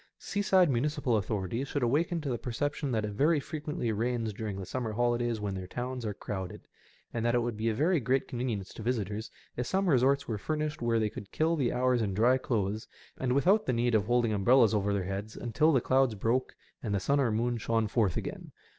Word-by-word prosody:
Seaside 195 -3 +2
municipal 140 -1 0
authorities 105 +5 -2
should 140 -2 -2
awaken 160 +7 +1
to 145 - -3
the 120 - -2
perception 140 +3 -2
that 110 -3 0
it 105 - -4
very 150 +9 +3
frequently 150 -5 -3
rains 115 0 -1
during 105 -1 -4
the 95 - -5
summer 115 +1 -3
holidays 120 0 0
when 100 -1 -3
their 95 -1 -5
towns 125 +2 -4
are 105 - -2
crowded^ 95 -3 -5 0.5
and 115 - -2
that 120 +1 +2
it 120 - +2
would 120 -2 -2
be 110 +2 0
a 110 - -1
very 160 +7 +2
great 130 +2 0
convenience 120 -6 -3
to - - -9
visitors 110 -2 -2 0.3
if 120 0 -2
some 190 0 +1
resorts 140 -1 +3
were 110 -3 -2
furnished 155 +5 -2
where 120 -1 +2
they 110 -2 0
could 100 - -9
kill 160 +2 +1
the 135 -6 +1
hours 125 -1 +2
in 100 -3 -1
dry 125 +5 +4
clothes 110 -3 -1 0.3
and 125 -1 0
without 190 +10 +3
the 130 - +2
need 120 0 +1
of 105 -2 +3
holding 120 -2 +2
umbrellas 115 +3 +4
over 100 -1 +1
their 100 -2 0
heads 100 +3 -5
until 125 +7 +2
the 135 - +4
clouds 130 -3 +2
broke 115 +5 0 0.3
and 105 -4 -1
the - - +1
sun 140 +9 +1
or 125 -5 +2
moon 120 +2 0
shone 115 0 0
forth 105 -4 +1
again. - - -5
120 Hz, 220 wpm, -30 LUFS, 110-135 Hz, 0.5 s, dry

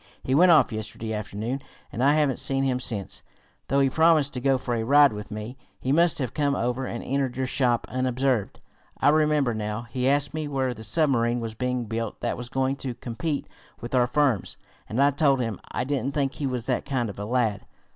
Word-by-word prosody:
He 130 - -1
went 175 +5 +6
off 150 -7 +5
yesterday 110 +1 -5
afternoon, 110 +5 -4 0.3
and 120 - -2
I 145 +2 +5
haven't 145 -5 +1
seen 135 0 +1
him 130 -2 +1
since, 105 -6 -5 0.5
though 140 - +2
he 135 - +4
promised 160 0 +3
to 125 - -4
go 135 0 +3
for 125 -1 -3
a 115 - 0
ride 145 +1 +6
with 105 0 -7
me. 110 +5 -7 0.2
He 130 - -2
must 170 +3 +3
have 130 -5 -3
come 145 -2 +1
over 125 +2 -1
here - - -5
and - - -5
entered 135 -2 -1
your 130 - 0
shop 125 -2 +1
unobserved. 130 -3 -1 0.4
I - - +4
remember 150 -4 +3
now 105 +1 -3
he 130 +1 +1
asked 145 0 +1
me 155 -1 -3
where 135 -3 -1
the 110 - -10
submarine 120 -2 +2
was 115 -1 -4
being 125 +1 -2
built 115 0 -4
that - - -1
was 125 -1 -7
going 135 +1 0
to 130 -3 -5
compete 140 +6 -3 0.3
with 120 +1 -7
our 125 -1 +4
firm's, 135 -7 +1 0.3
and 115 - -2
I 140 +1 +5
told 140 -2 +2
him. 115 -5 -2
I - - -1
didn't 135 0 -2
think 140 -2 0
he 145 - -3
was 125 -3 -3
that 125 - 0
kind 130 -4 -1
of 100 -1 -8
a 105 - -4
lad. 110 -3 0
130 Hz, 220 wpm, -25 LUFS, 115-140 Hz, 0.5 s, went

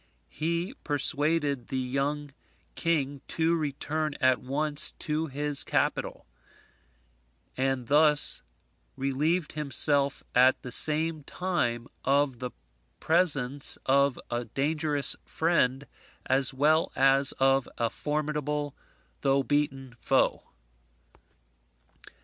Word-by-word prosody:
He 170 +7 -2
persuaded 145 -2 0
the 130 - -3
young 140 +3 -2 0.4
king 145 -5 -1
to 165 +1 0
return 155 0 -3
at 130 -1 +2
once 145 +3 0
to 155 +1 -2
his 145 0 0
capital: - - -2 1.3
and 130 -1 -1
thus 150 +3 +4 0.5
relieved 150 +5 -1
himself 140 -1 0
at 130 +1 +4
the 125 - -7
same 155 +3 +3
time 125 -12 -2 0.2
of 140 -2 +1
the 125 - -4 0.5
presence 145 -5 +1
of 140 0 +2
a 120 0 -2
dangerous 145 +4 +2
friend, 145 -5 0 0.4
as 130 0 +2
well 150 +4 +2
as 135 0 +4
of 135 -1 +2
a 115 - +1
formidable 150 +1 -3 0.5
though 135 0 +2
beaten 135 -3 -2
foe. - - +1
145 Hz, 95 wpm, -28 LUFS, 135-155 Hz, 1.3 s, thus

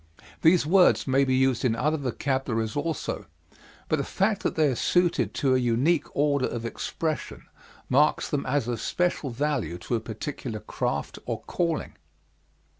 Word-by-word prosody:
These 165 -1 +5
words 155 - +4
may 135 +1 +3
be 130 -1 +2
used 130 -2 +2
in 120 -3 +2
other 150 +7 +1
vocabularies 130 -4 -2
also, 150 +1 -3 0.6
but - - +1
the - - -1
fact - - 0
that - - -1
they 155 - +3
are 130 - 0
suited 175 +6 +2
to 135 -3 +2
a 130 - +3
unique 130 +7 +2
order 140 -2 +2
of 120 -1 -5
expression 155 +6 -3 0.4
marks 150 +4 +3
them 145 -2 -1
as 130 -2 0
of 120 -3 -2
special 175 -5 0
value 125 - -1
to 90 - -5
a 115 - +2
particular 110 +1 -5
craft 105 - -3
or - - -3
calling. 170 -3 -2
135 Hz, 160 wpm, -26 LUFS, 120-150 Hz, 0.6 s, These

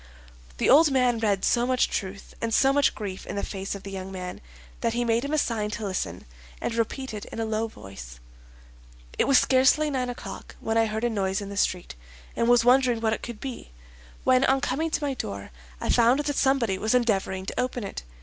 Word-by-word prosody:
The - - +1
old 305 +3 +7
man 250 -3 +2
read 205 -4 +1
so 240 0 +2
much 255 -1 +2
truth 195 0 -5
and 230 - -1
so 270 0 +4
much 285 0 +3
grief 195 -3 -6
in - - -5
the 200 - -2
face 195 0 -4
of 200 - -9
the 195 - -7
young 190 0 -6
man 180 -1 -6 0.4
that 230 - 0
he 240 0 0
made 230 +1 +1
him 280 - -3
a 310 - +1
sign 225 -7 0
to 220 - -5
listen, 135 - -3 0.3
and - - -2
repeated 230 -1 -3
in - - -8
a 225 - 0
low 220 +1 -1
voice: 60 - -11 1.0
"It - - +4
was 275 - +6
scarcely 265 +4 +4
nine 255 -2 -1
o'clock 245 - -8
when 225 - -2
I 225 0 +3
heard 220 +1 -3
a 240 - +2
noise 195 -3 0
in 200 -1 -6
the 200 - -6
street, 185 -3 -1 0.4
and 235 - +1
was 240 -1 +5
wondering 250 -2 +4
what 220 -1 +1
it - - -4
could 235 -3 -7
be, 255 - -7 0.5
when 255 0 +4
on 270 +1 +3
coming 285 +4 -1
to 300 -1 -2
my 280 -1 0
door, 100 - -6 0.3
I - - -3
found 240 +4 +4
that 290 -1 -2
somebody 250 -9 +2
was 220 +3 +1
endeavoring 195 -5 0
to - - -4
open 250 -2 -1
it. 195 - -5
230 Hz, 220 wpm, -26 LUFS, 200-255 Hz, 1.0 s, old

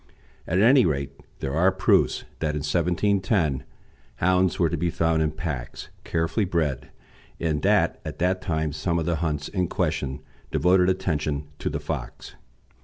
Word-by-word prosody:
At 90 +3 +1
any 125 +5 +6
rate, 70 -5 -1 0.3
there 70 - -2
are 90 +5 +4
proofs 95 +1 +2 0.2
that 75 -2 -1
in 75 - -3
1710 90 - +1 0.5
hounds 90 0 +2
were 85 - +3
to - - -2
be 85 +3 0
found 80 -1 +1
in 80 - +2
packs, 70 -7 -5
carefully 80 +6 0
bred, 75 -7 -1 0.5
and 80 -3 0
that - - +2
at - - -6
that 90 +2 +1
time 80 -2 -1
some 85 +3 -1
of 80 - -1
the 85 -1 0
hunts 75 -2 -2
in 90 -3 -1
question 70 -2 -2 0.3
devoted 90 +1 +3
attention 75 -5 -1
to - - -2
the - - -3
fox. - - -6
80 Hz, 160 wpm, -25 LUFS, 75-90 Hz, 0.5 s, any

